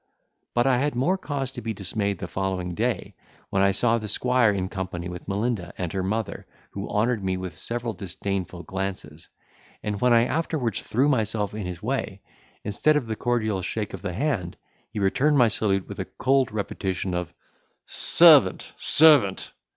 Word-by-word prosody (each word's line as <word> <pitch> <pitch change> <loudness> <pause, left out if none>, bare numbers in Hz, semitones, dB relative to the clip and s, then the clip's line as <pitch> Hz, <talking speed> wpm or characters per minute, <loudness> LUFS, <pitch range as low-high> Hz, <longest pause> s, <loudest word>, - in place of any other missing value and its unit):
But 120 +1 +3
I 130 -2 +3
had 145 +1 0
more 140 +10 +2
cause 140 -7 -4
to 125 - -7
be 110 -1 -4
dismayed 100 0 -1
the - - -6
following 95 -2 -3
day, - - -2 0.4
when 95 - +2
I 100 - +5
saw 115 +3 +3
the 110 - -6
squire 125 +2 +2
in 95 -2 -2
company 95 -2 -5
with 90 0 -8
Melinda 100 -3 -2
and 90 -2 -3
her 95 - -1
mother, 105 +4 -3 0.2
who 100 +1 -6
honoured 110 0 0
me 95 -1 -1
with 90 -3 -6
several 115 +5 -3
disdainful 95 -2 -4
glances; 95 -4 -5 0.5
and 105 -1 -3
when 125 - +4
I 115 0 +5
afterwards 155 -6 -1
threw 130 +6 +1
myself 110 -6 0
in 105 -3 -4
his 90 0 -7
way, 110 -5 -3 0.4
instead 110 +9 +2
of 150 -4 0
the 110 -1 -3
cordial 110 -5 -1
shake 105 +2 -4
of - - -7
the 95 -3 -4
hand, 105 - -2 0.3
he - - -9
returned 140 +10 +2
my 120 -3 +5
salute 95 -3 0
with - - -8
a - - -2
cold 135 -2 +1
repetition 95 -3 -3
of 90 -2 -3 0.5
"Servant, - - +5
servant!" 145 -11 +4
105 Hz, 175 wpm, -25 LUFS, 95-120 Hz, 0.5 s, I